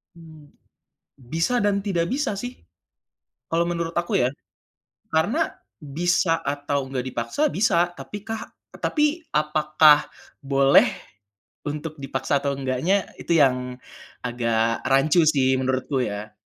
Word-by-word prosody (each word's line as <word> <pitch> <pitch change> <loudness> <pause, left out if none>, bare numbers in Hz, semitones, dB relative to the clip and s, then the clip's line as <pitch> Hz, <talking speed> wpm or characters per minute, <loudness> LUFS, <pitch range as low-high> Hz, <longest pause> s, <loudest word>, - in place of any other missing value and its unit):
Hmm, 155 -3 -15 0.7
Bisa 165 - -1
dan 200 -1 +1
tidak 180 -5 0
bisa 270 -8 -1
sih 245 +4 -5 0.9
kalau 170 +1 0
menurut 170 -1 -3
aku 175 0 0
ya, 125 - +2 0.8
karena - - +1 0.4
bisa 175 -1 +2
atau 145 -1 -2
enggak 130 -1 -3
dipaksa, 120 - -4
bisa, 175 -4 +2
tapi 205 -1 -8
kah 225 0 -4 0.4
tapi 300 - +1 0.3
apakah 150 0 +4 0.3
boleh 135 0 +5 0.8
untuk 150 +1 -5
dipaksa 135 +1 -1
atau 140 0 -1
enggaknya, 135 +7 0 0.3
itu - - -2
yang 130 -2 +4 0.7
agak 115 -2 0
rancu 145 +6 +4
sih 130 -1 +3
menurutku, 130 +1 -1
ya. 105 +1 -6
150 Hz, 115 wpm, -24 LUFS, 135-170 Hz, 0.9 s, boleh